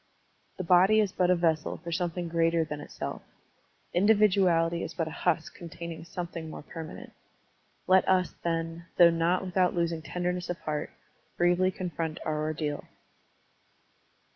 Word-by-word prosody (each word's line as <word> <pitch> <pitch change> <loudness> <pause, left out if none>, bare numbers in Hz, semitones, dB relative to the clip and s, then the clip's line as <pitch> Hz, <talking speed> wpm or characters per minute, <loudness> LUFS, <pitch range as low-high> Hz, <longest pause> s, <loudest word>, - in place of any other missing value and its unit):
The 185 - -3
body 185 +5 +5
is 205 -3 +2
but 180 -1 +1
a 180 - +5
vessel 165 -3 0
for 170 - -8
something 175 0 -2
greater 165 0 +2
than 150 -1 -6
itself. - - -6 0.7
Individuality 185 -4 +3
is 165 - -5
but 165 -2 -1
a - - -5
husk 160 +1 -1
contain 170 0 -8
ing 165 0 -8
something 170 -2 -6
more 155 - -8
permanent. 160 +1 -9 0.7
Let 185 0 +4
us, 185 -1 +2
then, 165 0 -2
though 170 -1 +8
not 170 +3 +1
without 185 0 +1
losing 170 -1 0
tenderness 180 +2 -3
of 175 - -2
heart, 150 0 -3 0.5
bravely 175 +1 +3
confront 170 -4 -4
our 155 -1 -1
ordeal. 155 -1 -3
170 Hz, 145 wpm, -28 LUFS, 165-180 Hz, 0.7 s, though